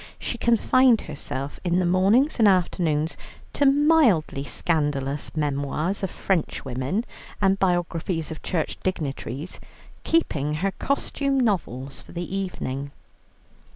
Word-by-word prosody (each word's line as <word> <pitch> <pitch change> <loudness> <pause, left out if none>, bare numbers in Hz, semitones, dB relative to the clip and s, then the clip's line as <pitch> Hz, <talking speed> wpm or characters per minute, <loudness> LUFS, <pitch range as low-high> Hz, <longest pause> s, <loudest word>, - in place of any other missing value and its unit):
She 235 - -4
confined 235 +1 +4
herself 140 -2 -5
in 175 -1 +1
the 185 - +2
mornings 200 - +3
and 220 - +6
afternoon 170 -5 +2 0.4
to 285 - +3
mildly 275 - +4
scandalous 145 -3 -1
memoirs 150 +5 -1
of 195 - -1
Frenchwomen 160 - -2 0.3
and 195 -1 +2
biographies 175 -3 0
of 155 - -7
Church 165 -4 -2
dignitaries, 150 -3 -4 0.4
keeping 150 - +1
her 195 +5 0
costume 275 +3 -1
novels 140 - -1
for - - -15
the 175 +2 -4
evening. 140 -8 -3
175 Hz, 115 wpm, -24 LUFS, 150-205 Hz, 0.4 s, and